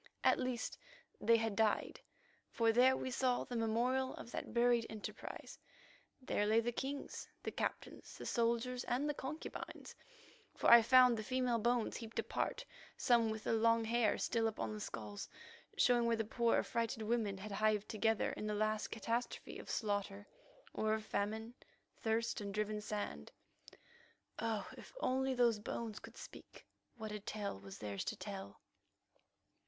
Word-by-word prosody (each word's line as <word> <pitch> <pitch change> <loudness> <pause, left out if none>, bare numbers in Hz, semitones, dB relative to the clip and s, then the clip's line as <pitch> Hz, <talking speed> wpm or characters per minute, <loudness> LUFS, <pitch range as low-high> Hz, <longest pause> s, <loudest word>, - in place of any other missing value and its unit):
At - - +5
least 255 -3 -2 0.4
they 230 0 +5
had 225 -2 -1
died, 220 0 +1 0.5
for 230 -1 +3
there 255 +3 +5
we 260 - -3
saw 250 0 +1
the 245 - -6
memorial 240 +4 +1
of 235 - -9
that - - -5
buried 240 -1 +3
enterprise. 215 -1 -7 0.6
There 210 -5 0
lay 220 +2 +5
the 235 +1 0
kings, 275 +4 -4
the - - -2
captains, - - -4
the - - -7
soldiers, 235 +1 +1
and 255 +5 0
the 295 - +1
concubines, 285 +3 -6 0.6
for - - +4
I 235 0 +11
found 250 0 +7
the 215 - -3
female 250 0 +1
bones 235 +1 +1
heaped 225 -2 -8
apart, - - -1 0.3
some 235 -2 +4
with 220 0 -4
the - - 0
long 230 0 +4
hair 230 -1 +2
still 230 -2 +1
upon 115 - -3
the 105 - -5
skulls, 105 -1 -6 0.5
showing 240 -1 +4
where 230 - +3
the 225 -1 -1
poor, 235 +2 +2
affrighted 230 -1 -1
women 215 -3 0
had 205 +2 -7
hived 215 0 +1
together 225 0 +1
in 215 - -4
the 210 - -1
last 215 0 0
catastrophe 230 +2 -3
of - - -10
slaughter 205 -2 -2 0.5
or 215 0 +1
of 220 0 -5
famine, 220 +3 -2 0.4
thirst, 225 0 0
and 200 -1 -5
driven 210 0 -1
sand. 205 - -4 1.1
Oh, 220 -3 -1
if - - -13
only 265 - +1
those 235 -3 +3
bones 220 0 -4
could - - -12
speak, - - -11 0.3
what 220 -2 -6
a 210 - -4
tale 205 - -4
was 95 -1 -10
theirs 100 -2 -4
to - - -2
tell! 195 - -7
225 Hz, 160 wpm, -37 LUFS, 210-240 Hz, 1.1 s, I